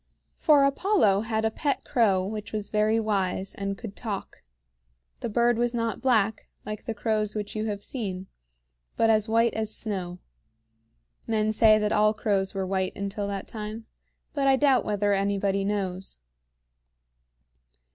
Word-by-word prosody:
For 295 -3 +5
Apollo 275 - +3
had 220 -1 0
a 220 - +1
pet 285 +5 -1
crow 200 -8 +2
which 210 +1 -5
was 210 -1 -4
very 215 +1 +2
wise, 195 -3 -1
and 195 0 -4
could 215 -4 -8
talk. 210 -5 -6 0.8
The - - -3
bird 235 +1 +2
was 240 0 +1
not 230 -1 -2
black, 220 -5 +1 0.2
like 215 0 -6
the 225 - -3
crows 215 0 -1
which 210 0 -4
you 215 0 -1
have 205 -2 -4
seen, 195 -7 -4 0.7
but 225 0 +4
as 215 0 +2
white 230 +1 +3
as 220 -1 -1
snow. 185 -5 -3 1.1
Men 215 -1 +1
say 215 0 +5
that 210 0 0
all 215 +1 +3
crows 195 -3 0
were 190 -1 -1
white 190 0 -1
until 200 +1 -3
that 200 -1 -4
time, 220 0 -6 0.5
but 280 -2 0
I 270 - +6
doubt 270 -2 +3
whether 205 -1 +1
anybody 200 0 0
knows. 195 - -2
215 Hz, 155 wpm, -26 LUFS, 200-225 Hz, 1.1 s, I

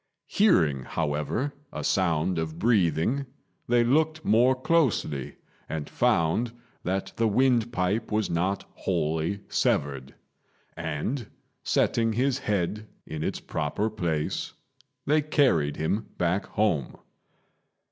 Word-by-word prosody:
Hearing, 80 - +3
however, 75 - -1 0.2
a - - -5
sound 85 -1 +1
of 80 0 -4
breathing, 110 - +2 0.4
they 120 0 +4
looked 155 +5 +1
more 125 +4 +4
closely, 130 - +1 0.3
and 80 -2 -3
found 105 +9 +1 0.3
that 95 +2 -2
the 115 - +3
windpipe 115 -3 +1
was 105 0 +1
not 90 +4 -1
wholly 80 +2 -1
severed; 70 -2 0 0.6
and, 110 - -3 0.3
setting 115 -1 +1
his 130 +3 +1
head 105 -1 -1 0.2
in 75 -1 -6
its - - -2
proper 110 +2 -2
place, 85 -7 -2 0.5
they 150 +2 +3
carried 125 - +2
him 100 +8 -1
back 90 +3 0
home. 95 - 0
100 Hz, 105 wpm, -27 LUFS, 80-120 Hz, 0.6 s, they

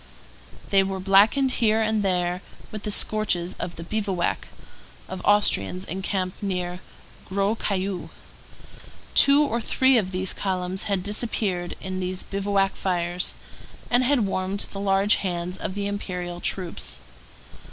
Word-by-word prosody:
They 195 -1 +5
were 195 0 -2
blackened 205 +8 +4
here 220 -1 +4
and 220 -1 +1
there 180 -2 0 0.3
with 215 - -6
the 210 - -4
scorches 200 -4 +1
of 175 - -4
the 165 - -7
bivouac 195 -2 -2 0.6
of 185 -1 -6
Austrians 185 - +3
encamped 185 +1 -3
near 180 -3 -3 0.5
Gros 200 +3 0
Caillou. 195 -2 -2 1.0
Two 280 +1 +6
or 240 -5 -1
three 260 +2 +3
of 190 -4 -2
these 185 0 0
columns 185 -1 -1
had 195 -3 -1
disappeared 205 -4 0
in 185 0 -4
these 185 0 -1
bivouac 195 0 0
fires, 175 -1 -1 0.6
and 245 +1 +4
had 255 -4 +2
warmed 190 +1 -2
the 195 - -5
large 195 +1 +3
hands 180 -1 -3
of 190 - -4
the 200 -1 -2
Imperial 180 -3 -4
troops. 180 -3 -1
195 Hz, 135 wpm, -25 LUFS, 180-205 Hz, 1.0 s, Two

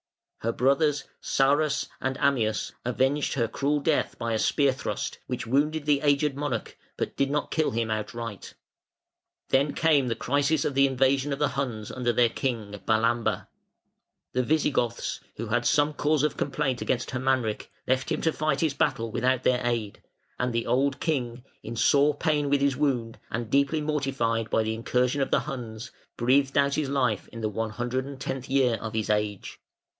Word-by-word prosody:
Her 115 - -1
brothers, 140 +4 +2 0.2
Sarus 140 +2 +2
and 130 0 -1
Ammius, 120 -7 +1
avenged 135 +5 0
her 120 -4 +1
cruel 140 +6 0
death 150 +1 0
by 115 -1 -2
a 110 - 0
spear 140 +2 +3
thrust, 130 - -4
which 125 - -3
wounded 145 +5 +1
the 145 -2 +3
aged 145 -1 +2
monarch, 140 -5 -3 0.2
but - - -3
did 140 0 +1
not 145 +1 -1
kill 155 -1 +1
him 115 0 -1
outright. 110 -1 -5 0.9
Then 140 +2 +2
came 150 -5 +3
the 115 - 0
crisis 145 +6 +1
of 145 - 0
the 135 +1 +5
invasion 135 +2 +2
of 140 - -1
the 150 +1 +1
Huns 125 -5 -3
under 125 -2 0
their 120 0 +3
King 115 -5 -3 0.2
Balamber. 115 +1 +1 0.9
The 125 - +2
Visigoths, 135 -4 0 0.2
who 115 0 -5
had 120 +2 +1
some 150 0 +3
cause 150 0 +1
of 150 - 0
complaint 135 -3 -1
against 125 -1 -1
Hermanric, 130 -4 0 0.2
left 130 +1 0
him - - 0
to 160 - +1
fight 155 -2 0
his 160 -4 +1
battle 115 -5 0
without 130 +2 +1
their 125 -1 +2
aid; 115 -4 -2 0.4
and 125 0 0
the 115 0 -1
old 135 +1 +1
king, 125 -6 -2 0.2
in 115 - -6
sore 145 +5 +4
pain 150 -3 +1
with 140 0 +2
his 140 -1 +2
wound 125 -5 -1
and 115 -1 -4
deeply 140 +3 +2
mortified 135 -7 -1
by 110 - +2
the 110 0 -1
incursion 125 +4 0
of 135 - 0
the - - +2
Huns, 120 -5 -6 0.3
breathed 135 +3 +2
out 140 0 +3
his 150 -2 -1
life 125 -7 0
in 115 - -9
the 110 - 0
one 110 +2 -2
hundred 120 +4 -2
and 140 -1 -8
tenth 135 -1 -4
year 130 -4 +3
of 110 0 -5
his 110 -1 -1
age. 105 -2 -2
130 Hz, 180 wpm, -27 LUFS, 115-140 Hz, 0.9 s, the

